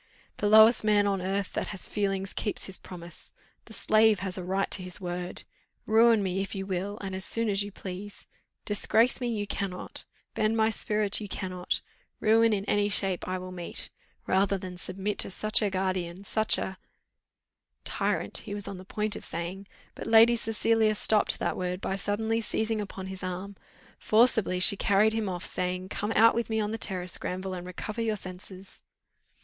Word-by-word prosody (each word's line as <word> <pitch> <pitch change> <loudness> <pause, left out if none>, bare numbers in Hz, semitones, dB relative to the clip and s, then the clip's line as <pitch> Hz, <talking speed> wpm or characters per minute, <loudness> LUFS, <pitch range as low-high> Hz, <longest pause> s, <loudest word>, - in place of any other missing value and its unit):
The 205 - 0
lowest 220 +2 +7
man 210 -1 +3
on 195 -2 0
earth 195 +1 -2
that - - -2
has 195 -3 -3
feeling 195 -2 -1
keeps 200 +2 -2
his 190 - -2
promise. 170 -2 -9 0.3
The 225 - -12
slave 215 -1 +3
has 190 -1 -3
a 185 - -5
right 190 +2 -1
to - - 0
his 180 -1 -6
word! 180 -1 -5 0.4
Ruin 225 -1 +5
me 190 0 -1
if 195 - -5
you 195 0 -4
will, 195 +2 -3
and 195 -1 -5
as 190 0 -4
soon 230 +3 0
as 200 0 +1
you 205 0 -4
please; 195 +2 -8 0.4
disgrace 225 +4 +2
me 245 - -1
you 215 -3 -2
cannot; 195 -2 -3 0.3
bend 215 +1 +1
my 220 0 +3
spirit 210 -1 +1
you 210 - -5
cannot; 185 -2 -3 0.4
ruin 225 +1 +4
in 200 -2 -1
any 205 0 +1
shape 195 -3 +3
I 185 0 -1
will 185 0 -7
meet, 175 -2 -3 0.3
rather 195 +1 +2
than 185 -1 -7
submit 190 +3 -2
to - - +3
such 215 +4 +3
a 210 - +1
guardian, 185 -1 -2
such 220 +2 +2
a 190 -1 -4 0.6
" - - -57 0.2
Tyrant - - 0
he 205 -2 -6
was 205 -1 -4
on 195 - -6
the 185 - -10
point 210 +1 -2
of - - -7
saying, 175 +4 -4 0.3
but - - -8
Lady 225 +1 +7
Cecilia 225 -1 +1
stopped 210 0 +3
that - - -1
word 180 0 -3
by 195 - -2
suddenly 220 +3 -1
seizing 220 0 -1
upon 195 -2 -7
his 190 0 -7
arm: 185 +2 -5 0.4
forcibly 220 -5 +3
she 200 +3 +6
carried 205 +2 +3
him 220 -3 -1
off, 180 -1 -4
saying 185 +1 -2
"Come 210 +1 -3
out 230 +1 +6
with 235 0 -2
me 220 0 0
on 210 0 -1
the 225 - -4
terrace, 180 -3 -3
Granville, 185 +1 -4
and 180 -1 -6
recover 215 +5 -5
your 220 -2 0
senses." 185 0 -9
200 Hz, 190 wpm, -28 LUFS, 185-215 Hz, 0.6 s, lowest